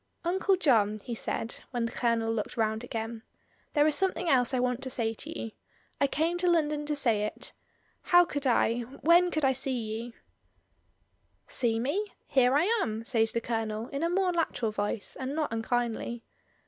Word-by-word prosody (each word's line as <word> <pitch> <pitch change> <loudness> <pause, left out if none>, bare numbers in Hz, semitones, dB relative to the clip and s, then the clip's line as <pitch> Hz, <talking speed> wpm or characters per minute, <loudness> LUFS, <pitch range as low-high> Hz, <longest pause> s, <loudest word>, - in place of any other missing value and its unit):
"Uncle 380 +2 +2
John," 220 - +3
he 240 - -5
said, 225 0 -3
when 240 -2 -1
the 230 - -3
Colonel 230 -2 0
looked 220 0 -4
round 220 0 0
again. 225 -1 -5 0.5
"There 295 -1 +4
is 305 - +3
something 375 -2 +1
else 250 -5 +4
I 255 - +1
want 250 0 0
to 260 - -4
say 225 -3 -1
to 315 +8 -7
you. 225 - -5 0.5
I 280 - +4
came 330 +5 0
to 360 0 +2
London 300 -3 +1
to 300 - 0
say 230 -7 +2
it 210 - -4 0.5
How 350 0 +5
could 285 -4 -2
I 235 -1 +3
— 270 - -14
when 350 +1 +7
could 310 -4 0
I 265 - +4
see 265 0 -2
you?" 225 +1 -5 1.3
"See 230 -3 0
me! 285 - 0 0.2
here 260 0 +3
I 295 - +4 0.2
am," 220 - -2
says 225 -2 +2
the 235 - -1
Colonel, 225 0 -3
in 280 0 -4
a 335 - +1
more 370 +1 +2
natural 315 -10 -1
voice, 205 0 -2
and 265 +2 -3
not 305 -7 -1
unkindly. 235 0 -2
250 Hz, 185 wpm, -29 LUFS, 225-300 Hz, 1.3 s, when